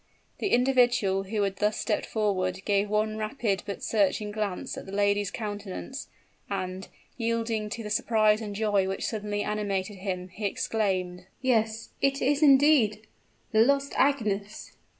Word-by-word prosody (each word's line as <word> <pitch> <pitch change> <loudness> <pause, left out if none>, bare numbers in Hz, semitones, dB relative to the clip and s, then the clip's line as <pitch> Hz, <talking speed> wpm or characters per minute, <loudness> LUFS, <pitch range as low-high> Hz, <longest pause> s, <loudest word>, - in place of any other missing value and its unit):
The - - 0
individual 245 - +3
who 210 +1 -1
had 195 -1 -2
thus 210 +1 +1
stepped - - -1
forward, 190 -4 -1
gave 200 0 +1
one 215 +1 0
rapid 215 -3 -1
but 200 - -5
searching 210 0 +1
glance 205 -3 -3
at - - -8
the - - -8
lady's 205 0 +1
countenance; 205 +5 -6 0.4
and, 185 -1 -4 0.3
yielding 230 -2 -1
to 230 +2 -5
the 210 - -6
surprise 215 -1 +3
and 205 -2 -5
joy 205 -2 +1
which 190 0 -3
suddenly 205 -2 -2
animated 205 -2 -2
him, 185 -1 -4
he 205 +4 -6
exclaimed: 185 -4 -1
"Yes 225 -3 0
it 275 0 +2
is, 285 +3 +1
indeed, 270 -7 +5 0.5
the 220 - +4
lost 280 +3 +2
Agnes!" 215 -7 0
210 Hz, 150 wpm, -27 LUFS, 195-225 Hz, 0.5 s, indeed